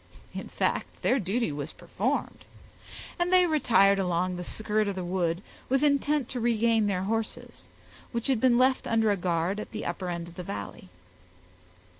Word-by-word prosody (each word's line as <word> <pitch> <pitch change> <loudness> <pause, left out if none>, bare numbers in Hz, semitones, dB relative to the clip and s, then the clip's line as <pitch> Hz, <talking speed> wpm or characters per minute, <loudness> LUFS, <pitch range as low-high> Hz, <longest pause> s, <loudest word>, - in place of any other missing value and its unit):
In - - -6
fact, - - -2
their 265 - +3
duty 205 0 -1
was 145 +1 -5
performed, - - -3 0.8
and 350 +1 +1
they 365 -1 +6
retired 225 - +4
along 180 0 0
the 180 - -5
skirt 215 +2 0
of 200 - -2
the 185 - -4
wood, 175 0 -1 0.3
with 270 +2 +2
intent 290 -2 +2
to 250 - -3
regain 230 -2 +2
their 185 -2 0
horses, 225 +2 -4 0.5
which 235 -1 -2
had 260 -5 +2
been 250 -2 +4
left 260 +1 +2
under 225 -2 +2
a - - +2
guard 180 +1 -1
at - - -6
the 220 - -6
upper 185 -2 -3
end 170 -1 -4
of 170 - -14
the 180 - -5
valley. 100 - -7
210 Hz, 175 wpm, -28 LUFS, 180-240 Hz, 0.8 s, they